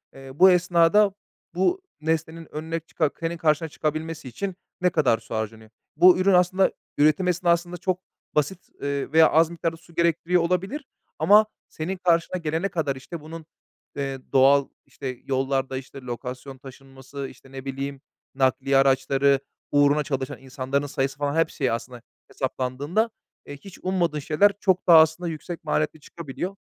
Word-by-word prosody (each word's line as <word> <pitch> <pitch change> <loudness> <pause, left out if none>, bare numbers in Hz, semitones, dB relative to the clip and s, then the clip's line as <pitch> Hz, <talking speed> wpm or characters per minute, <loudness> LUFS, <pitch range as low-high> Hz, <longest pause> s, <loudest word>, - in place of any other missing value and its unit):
Eee, 135 0 -11
bu 185 +3 +7
esnada 180 +3 +4 0.4
bu 350 - +1 0.2
nesnenin 160 +1 -2
önüne 160 +2 -3
çıka 155 -2 -1
senin 165 0 -3
karşına 160 0 +1
çıkabilmesi 155 0 -4
için 190 - -4 0.3
ne 180 - +4
kadar 145 -9 +2
su 115 0 -8
harcanıyor? 110 0 -5 0.3
Bu 180 +3 +7
ürün 190 +1 +3
aslında 180 +2 +3 0.3
üretim 155 +5 +3
esnasında 175 0 +1
çok 185 0 -1 0.4
basit, 150 +5 -1
eee, 140 0 -2
veya 160 0 +6
az 160 +1 +4
miktarda 165 -1 -3
su 170 0 -20
gerektiriyor 170 +1 +2
olabilir. 190 - -1 0.3
Ama 210 +2 +6 0.2
senin 180 +5 -4
karşına 175 0 +1
gelene 165 +3 -1
kadar, 145 -7 -1
işte, 150 +5 -8
bunun, 160 +1 -9 0.5
eee, 135 -1 -3
doğal, 135 +1 +5 0.2
işte, 130 -1 -7
yollarda, 135 0 -1
işte, 135 +1 -9
lokasyon 125 +2 -7
taşınması, 135 +1 -9
işte, 135 +1 -16
ne 135 0 -8
bileyim 135 0 -5 0.3
nakliye 135 +1 +2
araçları, 135 0 +3 0.3
uğruna 145 +1 +4
çalışan 135 -2 -3
insanların 135 +2 -3
sayısı 135 0 -2
falan, 145 0 -1
hepsi 165 -3 0
ya, 130 - +2
aslında 120 0 -9 0.3
hesaplandığında 140 - -1 0.4
eee, 145 - -8
hiç 190 +5 -13
ummadığın 175 -5 0
şeyler 160 +8 +3
çok 190 -2 +1
daha 165 -2 +9
aslında 160 +2 +2
yüksek 165 +2 -7
maliyetli 155 0 -1
çıkabiliyor. 170 +5 -6
155 Hz, 150 wpm, -24 LUFS, 135-170 Hz, 0.5 s, daha